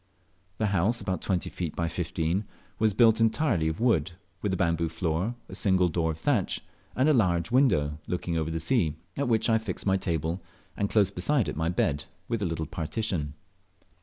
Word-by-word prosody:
The 110 - 0
house, 100 +6 +2
about 95 -4 -2
twenty 90 -3 -1
feet 85 -4 -4
by 85 - 0
fifteen; 85 +3 -1 0.3
was 110 -2 +2
built 115 -1 +5
entirely 115 - +2
of 80 0 -2
wood, 95 -9 +2 0.3
with 105 - -1
a 95 - 0
bamboo 85 -2 +1
floor, 85 +7 -1
a - - -11
single 95 -3 +2
door 80 0 0
of 80 - -3
thatch, 80 - 0 0.3
and 130 +3 +3
a 155 - +5
large 90 - +2
window, 75 - +3
looking 90 -1 -2
over 80 -1 0
the 80 0 -2
sea, 80 - +1 0.2
at 140 -1 -1
which 115 -2 +2
I 115 -1 +3
fixed 110 -5 -5
my 95 -1 +3
table, 85 -1 -2 0.3
and 100 - -1
close 105 -4 +3
beside 125 +6 +1
it - - -4
my 80 +2 0
bed, 75 -4 0 0.2
within 110 -5 -1
a - - -3
little 80 -1 -2
partition. 80 -2 -2
90 Hz, 195 wpm, -28 LUFS, 80-110 Hz, 0.3 s, built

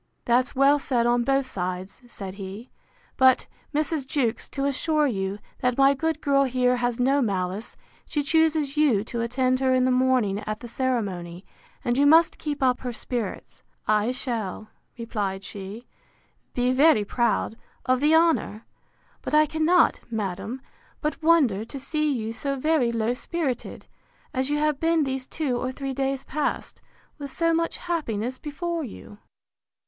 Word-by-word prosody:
That's 250 +3 +2
well 275 +2 +5
said 245 -4 0
on 240 0 +3
both 270 +2 +2
sides, 185 -3 -5
said 195 -5 -7
he: 195 +6 -8 0.5
but, 260 -1 +5 0.3
Mrs. 300 -2 -1
Jewkes, 245 -5 -1
to 275 0 -2
assure 300 +2 +1
you, 195 -6 -1 0.2
that 250 -1 0
my 275 0 +6
good 320 +2 -2
girl 275 -1 +3
here 250 -1 +2
has 245 -1 -1
no 270 +3 +3
malice, 195 -1 -2 0.3
she 295 -2 -1
chooses 310 -1 +2
you 280 -10 +3
to 235 +1 -4
attend 255 +2 +1
her 260 -1 +3
in 255 0 +3
the 255 - +3
morning 250 -6 +2
at 215 0 -3
the 240 - -7
ceremony, 200 -9 -2 0.4
and 240 +2 +1
you 285 - +5
must 325 +2 +5
keep 295 -3 -3
up 255 -1 +3
her 250 - -4
spirits.—I 215 -1 -3
shall, 225 -5 -3 0.3
replied 205 -4 -3
she, 200 +5 -8 0.7
be 245 0 +2
very 270 -6 +5
proud 235 0 0 0.3
of 255 -1 +2
the 300 +3 +4
honour: 320 -10 +2 0.6
But - - -1
I 305 0 +6
cannot, 320 +3 +3
madam, 220 +3 -4 0.4
but 300 +2 -2
wonder 295 -11 +3
to 275 - -8
see 305 +2 -1
you 225 -4 -2
so 275 +4 -2
very 275 -3 +2
low 230 +1 0
spirited, 275 -1 -4 0.5
as 260 0 -1
you 295 - +1
have 300 -2 +1
been 330 -1 +2
these 265 -1 -3
two 280 -6 -2
or 255 +1 -2
three 270 0 -4
days 270 0 -1
past, 300 +1 -3 0.4
with 280 -1 -6
so 330 +3 +2
much 335 0 0
happiness 255 -8 -3
before 335 +2 -3
you. 210 -4 -10
255 Hz, 160 wpm, -25 LUFS, 230-290 Hz, 0.7 s, my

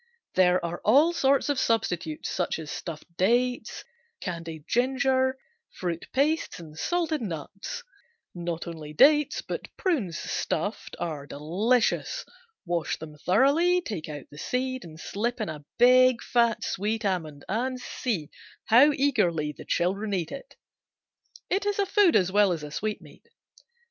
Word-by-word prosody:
There 180 -1 +3
are 170 +1 -4
all 290 +10 +5
sorts 275 -4 +2
of 285 -2 +1
substitutes 175 -10 -1
such 180 - -1
as 155 -2 -7
stuffed 170 0 -7
dates, 240 +4 +1 0.4
candied 165 -4 -6
ginger, 260 +1 +2 0.3
fruit 170 -2 -4
pastes 300 - 0
and 155 -2 -11
salted 325 - -1
nuts. 195 - -6 0.5
Not 170 -1 -4
only 160 -3 -7
dates, 295 - +4
but - - -5
prunes, 245 - 0
stuffed, - - -3
are 150 -4 -4
delicious. 220 - 0 0.4
Wash 175 -2 -1
them 155 -1 -9
thoroughly, 280 - +3
take 205 - -5
out 145 -3 -7
the 145 - -11
seed 255 +4 -2
and 160 -2 -11
slip 235 +9 -2
in 215 - -2
a 150 -2 -7
big, 255 0 +6
fat, 235 -2 +2
sweet 215 +3 -2
almond, 160 -7 -2
and 250 +5 -1
see 210 - -3 0.3
how 255 +7 +7
eagerly 180 - +1
the - - -11
children 195 +4 0
eat 170 -4 -2
it. 275 - -9 0.9
It 390 +2 0
is 410 - 0
a 400 - +2
food 390 -3 +4
as 185 -1 +3
well 205 -1 +4
as 165 -3 -2
a 150 - -7
sweetmeat. 215 +6 -5
210 Hz, 145 wpm, -27 LUFS, 170-260 Hz, 0.9 s, how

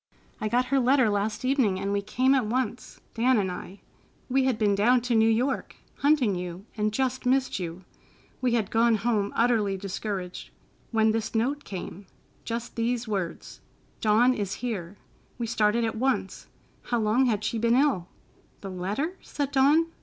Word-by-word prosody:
I 215 - 0
got 245 +3 +2
her 275 - +5
letter 255 -3 +3
last 205 +4 -1
evening, 255 -8 +2
and 200 +1 -2
we 200 - 0
came 255 +6 +2
at 260 -5 +2
once, 240 0 -3
Dan 245 +2 +3
and 190 -3 0
I. 190 +2 -8 0.5
We 265 +1 +2
had 260 -4 +1
been 210 -2 +2
down 240 +5 +3
to 245 0 -1
New 225 0 +4
York, 250 +5 0 0.2
hunting 280 -7 +3
you, 180 +1 -5
and 215 -1 0
just 260 +2 -1
missed 260 -3 +1
you. 175 +1 -6 0.6
We 250 -2 +1
had 215 -4 -1
gone 230 0 +4
home 215 -2 0
utterly 220 -5 +2
discouraged, 190 -1 -5 0.4
when 220 -1 +3
this 220 0 -3
note 270 +6 0
came, 190 0 -7 0.4
just 235 +1 -4
these 235 0 -1
words, 195 -5 -4 0.4
'Dawn 225 +4 +4
is 205 -4 -3
here.' 195 -5 -4 0.4
We 240 - -2
started 225 0 +1
at 225 - -2
once. 265 +3 -1 0.4
How 240 - 0
long 225 +4 +2
had 215 -3 0
she 220 +1 -1
been 235 +1 +3
ill?" 260 -10 +2 0.5
"The 195 - -6
letter?" 205 - -3
said 285 -1 -4
Dawn. 285 +5 +4
225 Hz, 170 wpm, -27 LUFS, 205-255 Hz, 0.6 s, her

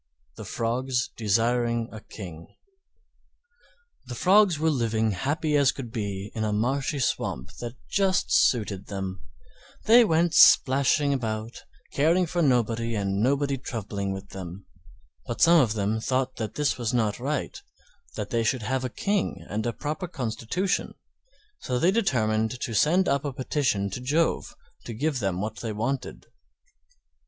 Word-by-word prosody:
THE - - -9
FROGS 125 +2 -1
DESIRING 115 +2 +1
A 110 - -8
KING 85 -8 -10 1.6
The 125 - -6
Frogs 190 - +4
were 160 +1 +1
living 110 -5 0
as 95 - -7
happy 150 +2 0
as 140 -2 +4
could 125 -5 -8
be 100 -2 -4
in 110 - -3
a 110 - 0
marshy 135 +7 0
swamp 65 - -2
that 120 0 -6
just 195 -1 +1
suited 105 -5 +2
them; 95 -2 -5 0.6
they 235 +3 +7
went 170 -4 +2
splashing 140 -1 +5
about 110 -3 -4 0.3
caring 165 +6 +3
for 175 +1 -1
nobody 115 -4 +1
and 100 -1 -1
nobody 140 +2 +1
troubling 100 -6 -4
with 95 +1 -7
them. 95 0 -8 0.6
But 120 - -4
some 170 -1 +6
of 115 -5 +1
them 105 +1 0
thought 130 +2 -1
that 110 -2 -4
this 145 -3 0
was 120 +1 -1
not 110 -1 0
right, 140 +4 -3 0.5
that 105 -1 -5
they 115 -1 +1
should 115 +1 0
have 130 +3 -1
a 130 - -2
King 200 - -2
and 110 +2 -2
a - - 0
proper 155 +9 -4
constitution, 130 - -2 0.6
so 125 - -2
they 170 +8 +3
determined 115 - 0
to 115 - -3
send 170 - +3
up 140 0 +1
a 145 - -2
petition 130 -7 -1
to 125 - -5
Jove 150 +6 0 0.3
to 115 - -6
give 145 +2 -1
them 95 -4 -1
what 110 +1 -4
they 115 - -4
wanted. 120 +6 -3
120 Hz, 155 wpm, -26 LUFS, 110-145 Hz, 1.6 s, they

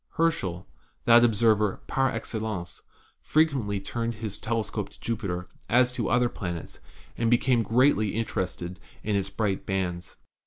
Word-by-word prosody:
Herschel, 95 - 0 0.4
that 120 0 +7
observer 110 -2 +3
'par 135 0 +1
excellence,' 110 -5 -4 0.4
frequently 135 -11 +1
turned 115 +4 -3
his 110 -2 -5
telescope 110 -1 -2
to - - -18
Jupiter 100 -6 -3 0.2
as 125 +1 +4
to - - -1
other 125 0 +3
planets, 85 -7 -6 0.4
and 115 -1 +2
became 120 0 +3
greatly 115 -2 +3
interested 95 -4 -3 0.2
in 105 -1 0
its 100 -1 0
bright 100 -3 -2
bands. 90 -3 -3
110 Hz, 130 wpm, -27 LUFS, 95-120 Hz, 0.4 s, that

